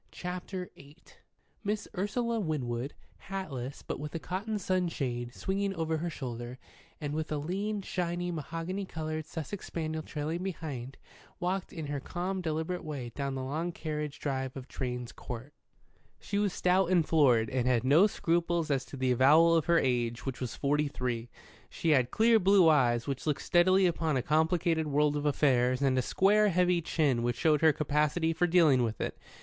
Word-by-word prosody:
CHAPTER 180 +1 -5
VIII 140 +2 -15 0.7
MISS 210 0 -2
URSULA 230 +4 -1
WINWOOD, 135 - -2 0.3
hatless, 140 -10 -5
but - - -5
with 150 +2 -6
a - - -1
cotton 200 +6 -3
sunshade 155 -11 -1
swinging 195 0 -1
over 160 -1 -1
her 170 +2 -2
shoulder, 125 -4 -6 0.4
and 145 -1 -4
with 155 0 -3
a 150 - 0
lean, 195 +7 -2
shiny, 175 -1 -2
mahogany 165 +5 -4
coloured 155 -3 -4
Sussex 165 +5 -6
spaniel 160 -1 -3
trailing 155 +3 -4
behind, 145 -9 -5 0.4
walked 185 +1 -2
in 160 -2 -6
her 145 0 -3
calm, 185 +6 -3
deliberate 160 +2 -2
way 140 -6 -5
down 140 -1 -3
the 130 - -3
long 155 +6 -2
carriage 150 -3 -4
drive 135 -2 -3
of 130 0 -8
Drane's 125 -2 -4
Court. 125 +4 -8 0.7
She 200 - -2
was 205 -2 +1
stout 180 0 +2
and 175 -4 +3
florid, 130 -7 +4
and 125 -1 0
had 120 -2 +2
no 150 +10 +6
scruples 170 -4 0
as 135 -2 +1
to 140 - -9
the 130 -1 +1
avowal 150 +7 +6
of 160 - +2
her 170 0 +4
age, 120 -4 0
which 135 -2 -4
was 125 - -3
forty 150 +1 +1
three. 120 -4 -3 0.4
She 165 - -2
had 130 -4 +3
clear 225 - +4
blue 195 -2 +5
eyes 120 -6 +3
which 140 +1 -4
looked 150 - 0
steadily 185 +2 +4
upon 160 -4 +1
a 125 - -1
complicated 160 +1 +1
world 150 0 +2
of 145 0 -1
affairs, 130 -3 +2
and 135 -2 +2
a 130 - +3
square, 205 +9 +3
heavy 180 -1 +2
chin 145 -7 +1
which 120 0 0
showed 155 -1 +3
her 160 -1 +6
capacity 150 +3 +1
for 175 +2 +1
dealing 165 -7 +5
with 115 -2 -1
it. - - -3
155 Hz, 175 wpm, -30 LUFS, 135-175 Hz, 0.7 s, no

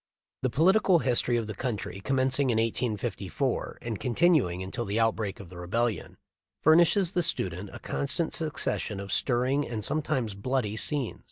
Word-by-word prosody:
The 130 - +1
political 185 - +4
history 120 -4 +2
of 115 - -1
the 110 - -5
country, 105 -4 -4
commencing 135 0 +2
in 120 - +2
1854 115 +2 -2
and 115 -3 -4
continuing 125 - +2
until 105 +6 -4
the 105 +1 -1
outbreak 110 -3 0
of 95 -4 -10
the 90 -1 -10
Rebellion, 115 +6 -2 0.4
furnishes 170 +3 +5
the 180 - +1
student 95 - -1
a - - -8
constant 155 +4 -2
succes 155 -2 -1
sion 105 -3 -4
of 100 0 -4
stirring 130 +3 +1
and 110 -3 -3
sometimes 145 -8 -1
bloody 110 +1 -1
scenes. 135 +2 -2
120 Hz, 160 wpm, -28 LUFS, 105-145 Hz, 0.4 s, furnishes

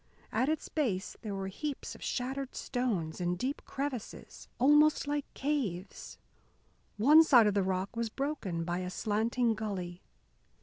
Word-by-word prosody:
At 260 - +1
its 315 -1 -1
base 215 -12 -1
there 210 -3 -4
were 195 0 -3
heaps 280 +9 -5
of - - -13
shattered 265 +1 -3
stones, 195 -11 -2
and 175 0 0
deep 260 +9 -2
crevices 270 -5 -5
almost 295 +4 +5
like 290 0 -2
caves. 225 - -3 0.8
One 295 +9 +8
side 250 -8 +6
of 210 - +3
the 200 - +2
rock 190 +3 -2
was 230 -1 -1
broken 225 - -3
by 175 +1 -2
a 180 0 -3
slanting 225 +4 +1
gully. 190 -5 -4
230 Hz, 145 wpm, -31 LUFS, 190-275 Hz, 0.8 s, One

